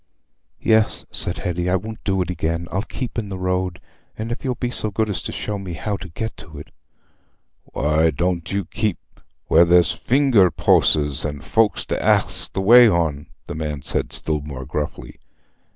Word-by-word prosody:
"Yes," 110 -1 +2
said - - 0
Hetty, 90 0 -2
"I 90 - +2
won't 110 +4 -5
do 95 -2 +1
it 90 - -5
again. 85 0 -2
I'll 95 - 0
keep 120 +2 -5
in 105 -3 -6
the 95 - -5
road, 90 -1 -2 0.4
if 115 +2 -5
you'll 130 -2 -1
be 120 +1 -3
so 110 - +2
good 110 +2 -1
as 95 - -2
show 105 -1 -4
me 95 -3 -6
how 100 +5 -3
to 95 - -10
get 110 +7 -5
to 80 -1 -12
it." 75 - -11 0.9
"Why 75 +2 +1
dooant 85 +2 -2
you 100 -2 -1
keep 105 +1 -2 0.5
where 85 - +5
there's 85 -2 +4
a - - -13
finger 125 -8 +3
poasses 75 -2 +3
an' 75 -2 -4
folks 110 +8 +1
to - - -3
ax - - +2
the 95 - -2
way 120 +5 +8
on?" 80 -6 -1 0.2
the - - -6
man 75 -3 -4
said, - - -2
still 75 -1 -2
more 70 -3 -7
gruffly. 75 +3 -5
90 Hz, 185 wpm, -21 LUFS, 80-105 Hz, 0.9 s, way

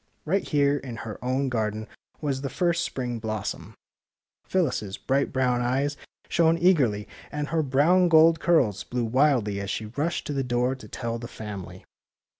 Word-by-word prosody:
Right 190 +5 +1
here 145 -1 +2
in 125 -4 -7
her 110 0 -7
own 130 +2 0
garden 110 -2 -2 0.3
was 140 -3 -1
the 135 - -3
first 170 +1 +1
spring 120 -3 -3
blossom. 110 -1 -4 0.7
Phyllis 175 -9 0
's 100 -2 -6
bright 135 +1 0
brown 125 -2 +1
eyes 135 +4 0 0.3
shone 165 0 +3
eagerly, 140 - +3 0.2
and 150 0 -3
her 165 0 +1
brown 155 +6 +3
gold 165 0 +6
curls 120 - +2
blew 125 -1 -2
wildly 120 -5 +2
as 100 -1 -4
she 110 - -3
rushed 145 +10 -2
to 145 - -3
the 135 -1 0
door 125 +1 +1
to 130 -5 -10
tell 115 +2 -4
the 120 - -7
family. 95 -5 -8
130 Hz, 170 wpm, -26 LUFS, 110-150 Hz, 0.7 s, gold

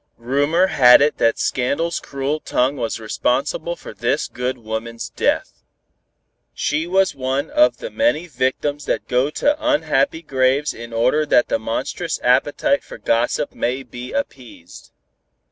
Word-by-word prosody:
Rumor 145 +9 +2
had 125 -9 +7
it 145 +1 +1
that 115 0 +3
scandal's 140 +7 -1
cruel 140 +3 -3
tongue 130 -1 0
was 115 -3 -3
responsible 140 +9 -1
for - - -11
this 120 +7 -1
good 125 +1 -3
woman's 115 0 -6
death. - - -1 0.9
She 155 +3 -1
was 190 +1 +2
one 135 - -2
of 300 +1 +4
the - - -7
many 280 - +1
victims 145 0 -2
that - - -2
go 125 +3 +1
to 290 - +1
unhappy 160 - +1
graves 135 +1 +1
in 115 0 -9
order 125 +7 +2
that 120 - +3
the - - +1
monstrous 130 +9 -3
appetite 145 - +2
for - - -10
gossip 115 +1 0
may 130 +3 -2
be 125 0 -9
appeased. 125 - -7
135 Hz, 145 wpm, -20 LUFS, 125-155 Hz, 0.9 s, had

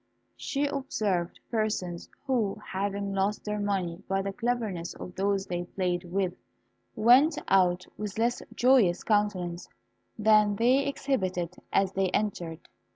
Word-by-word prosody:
She 285 0 -1
observed 215 -11 -1
persons 210 -6 -2 0.2
who, 235 -7 0
having 200 +1 -2
lost 195 +2 -1
their 210 0 -2
money 190 -4 -1
by 195 0 0
the 195 0 -3
cleverness 225 -7 -2
of 180 - -8
those 195 +1 0
they 175 -2 -3
played 180 -1 -2
with, 180 0 -1 0.6
went 265 +8 +5
out 180 -2 +3
with 210 -1 -4
less 235 +2 +1
joyous 240 -9 +4
countenances 190 -5 0 0.5
than 210 -1 +4
they 255 +6 +3
exhibited 185 -11 -1 0.2
as 195 -1 +2
they 190 -1 0
entered. 175 -7 -2
200 Hz, 130 wpm, -28 LUFS, 180-220 Hz, 0.6 s, went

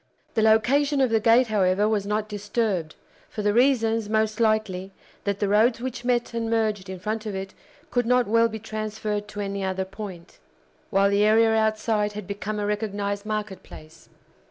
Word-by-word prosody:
The 220 - +1
location 270 +7 +3
of 260 -3 +2
the 225 - +3
gate, 230 +2 +4
however, 200 -1 +2
was 210 -2 0
not 210 +1 -1
disturbed, 205 -5 -2 0.3
for 210 - -5
the 205 0 +2
reasons, 230 -3 +2
most 220 0 0
likely, 215 -4 0 0.3
that 200 -1 0
the 205 - +1
roads 220 +4 +3
which 250 -1 -5
met 245 -1 0
and 230 -1 -2
merged 215 -4 0
in 190 - -5
front 215 +3 -3
of 205 - -4
it 190 0 -6 0.4
could 245 -2 0
not 250 0 +3
well 230 +2 +3
be 220 -1 -6
transferred 215 -1 -4
to 210 0 -6
any 200 0 -3
other 190 0 -2
point, 190 -3 -9 0.5
while 200 +1 +3
the 200 +1 +3
area 220 +1 +4
outside 215 -1 +1
had 210 -1 -6
become 205 +2 -4
a 205 - -2
recognized 205 -1 -2
market 215 -2 -3
place. 155 +1 -14
215 Hz, 180 wpm, -25 LUFS, 200-225 Hz, 0.5 s, gate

